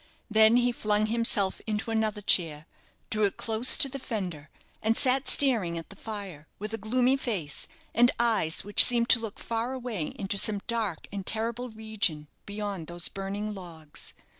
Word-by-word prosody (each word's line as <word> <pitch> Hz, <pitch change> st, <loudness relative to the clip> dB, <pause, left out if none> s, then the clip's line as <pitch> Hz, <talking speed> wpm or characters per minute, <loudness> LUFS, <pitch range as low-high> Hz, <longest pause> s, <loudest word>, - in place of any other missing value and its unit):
Then 220 Hz, +2 st, +5 dB
he 245 Hz, 0 st, +2 dB
flung 215 Hz, -2 st, 0 dB
himself 215 Hz, -3 st, +2 dB
into 220 Hz, +1 st, -3 dB
another 220 Hz, -2 st, -1 dB
chair, 160 Hz, -6 st, +2 dB, 0.5 s
drew 215 Hz, -1 st, +2 dB
it 200 Hz, -, -3 dB
close 225 Hz, +2 st, +2 dB
to -, -, +7 dB
the 275 Hz, +1 st, -7 dB
fender, 180 Hz, -, -6 dB, 0.3 s
and 225 Hz, +1 st, +1 dB
sat 265 Hz, +1 st, +4 dB
staring 220 Hz, -12 st, +4 dB
at 165 Hz, -, -8 dB
the -, -, -10 dB
fire, 195 Hz, -9 st, -8 dB
with 210 Hz, +2 st, -7 dB
a 225 Hz, -, -4 dB
gloomy 250 Hz, +5 st, +1 dB
face, 205 Hz, -, -4 dB, 0.3 s
and 240 Hz, +1 st, +5 dB
eyes 220 Hz, -9 st, +2 dB
which 205 Hz, +1 st, +6 dB
seemed 235 Hz, -1 st, +3 dB
to 235 Hz, -, +8 dB
look 225 Hz, -2 st, -7 dB
far 230 Hz, +2 st, -3 dB
away 240 Hz, -11 st, -4 dB
into 200 Hz, 0 st, -2 dB
some 205 Hz, -1 st, +2 dB
dark 225 Hz, -8 st, -3 dB
and 200 Hz, -1 st, -5 dB
terrible 230 Hz, +3 st, -2 dB
region 215 Hz, -9 st, -3 dB, 0.2 s
beyond 205 Hz, -5 st, -5 dB
those 175 Hz, 0 st, -2 dB
burning 200 Hz, +2 st, -5 dB
logs. 165 Hz, -6 st, -9 dB
215 Hz, 170 wpm, -27 LUFS, 195-230 Hz, 0.5 s, to